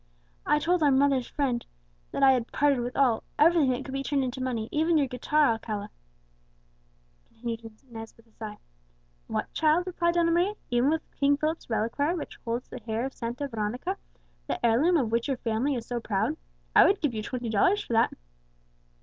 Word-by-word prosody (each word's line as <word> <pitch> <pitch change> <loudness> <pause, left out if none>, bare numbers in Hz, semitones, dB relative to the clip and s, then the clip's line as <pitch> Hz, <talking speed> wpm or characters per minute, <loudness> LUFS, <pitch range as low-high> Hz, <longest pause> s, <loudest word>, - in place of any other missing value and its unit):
"I 295 - +4
told 345 +3 +1
our 295 - +5
mother's 270 -2 +3
friend 255 -5 -1 0.5
that 275 - -2
I 270 - +8
had 245 -3 0
parted 285 -3 +2
with 245 +1 -4
all, 250 -5 +3 0.2
everything 315 -3 +5
that 255 +1 -1
could 265 - -7
be 270 - -1
turned 275 0 0
into 255 0 -4
money, 240 -4 -2
even 320 +2 +2
your 290 - +3
guitar, 280 +4 +1
Alcala," 215 -2 -4 1.4
continued 230 -1 -6 0.2
Inez 225 -2 -9
with 230 - -21
a 225 - -28
sigh. 215 -1 -8 0.7
"'What, - - -3
child!' 320 +3 +3
replied 345 -2 0
Donna 335 -1 +3
Maria, 360 +5 +2 0.2
'even 245 +3 +3
with 320 0 0 0.2
King 280 0 +4
Philip's 310 0 -2
reliquary, 240 +9 0
which 325 - -7
holds 235 +1 -3
the 255 - -8
hair 225 +2 -2
of 270 - -5
Santa 240 +4 -4
Veronica, 245 - -3 0.5
the - - -2
heirloom 285 +10 +4
of 240 -7 0
which 230 +2 +1
your 270 -2 -1
family 235 +5 0
is 235 -2 -4
so 240 0 -3
proud? 200 -4 -1 0.4
I - - +9
would 400 - +3
give 295 -6 0
you 215 - -3
twenty 240 +1 -4
dollars 370 - +3
for - - -5
that!'" 225 - +4
260 Hz, 190 wpm, -27 LUFS, 230-300 Hz, 1.4 s, I